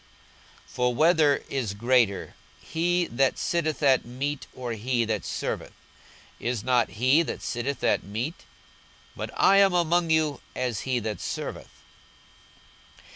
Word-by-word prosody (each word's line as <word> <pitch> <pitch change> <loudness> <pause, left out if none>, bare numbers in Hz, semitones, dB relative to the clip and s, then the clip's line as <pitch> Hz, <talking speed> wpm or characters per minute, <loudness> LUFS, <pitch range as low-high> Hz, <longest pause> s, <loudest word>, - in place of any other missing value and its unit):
42:022:027 - - -29
For 125 -1 0
whether 155 -1 +4
is 125 -7 -2
greater, 115 -2 +1 0.3
he 175 +2 0
that 135 -2 +1
sitteth 160 -3 -1
at 135 -2 +4
meat, 135 +4 -4
or 125 -2 -5
he 120 +2 0
that 110 -4 -2
serveth? - - -4 0.7
is 120 -3 -2
not 125 -3 +2
he 130 +7 +4
that 165 - -4
sitteth 125 +4 -3
at - - +2
meat? 115 - -5 0.7
but - - -5
I 195 - +5
am 195 -2 +5
among 175 0 +2
you 155 -3 +1
as 125 -5 -2
he 130 - +2
that 105 -4 -4
serveth. - - -6
130 Hz, 135 wpm, -26 LUFS, 120-160 Hz, 0.7 s, I